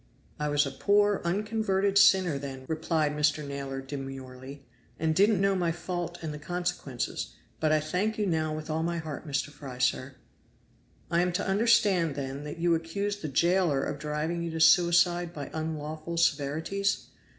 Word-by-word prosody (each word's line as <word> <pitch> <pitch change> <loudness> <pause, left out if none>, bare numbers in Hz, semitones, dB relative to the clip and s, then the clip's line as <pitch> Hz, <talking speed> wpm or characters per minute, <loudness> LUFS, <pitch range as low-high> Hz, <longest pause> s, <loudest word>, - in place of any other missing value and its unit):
"I 150 0 -1
was 145 0 +3
a - - -4
poor 205 0 +2
unconverted 200 +1 0
sinner 190 -6 +5
then," 135 -2 -7
replied 160 -1 0
Mr. 150 0 +1
Naylor 140 -1 -4
demurely, 135 0 -8 0.3
"and 160 0 +1
didn't 200 +3 +4
know 195 0 +3
my 175 -3 +1
fault 175 0 -4
and 155 -2 -3
the 150 - -7
consequences; 150 - -3 0.2
but 155 -1 +2
I 155 - +4
thank 185 +8 -1
you 210 - 0
now 160 -4 0
with 155 0 -5
all 155 +1 -1
my 170 +1 -1
heart, 160 -1 -6
Mr. 140 0 -1
Fry, 135 -3 -9
sir." 130 +1 0 1.0
"I 170 0 +3
am 180 0 +1
to - - -1
understand 195 -6 +3
then 140 +1 -5
that 150 - -6
you 170 0 +2
accuse 200 +5 -2
the 180 - -5
jailer 170 -1 +2
of 145 -1 -3
driving 150 +3 -2
you 170 - -3
to 160 0 -4
suicide 175 +1 +4
by 145 -3 -6
unlawful 155 +1 -4
severities?" 160 +6 0
160 Hz, 170 wpm, -28 LUFS, 145-180 Hz, 1.0 s, sinner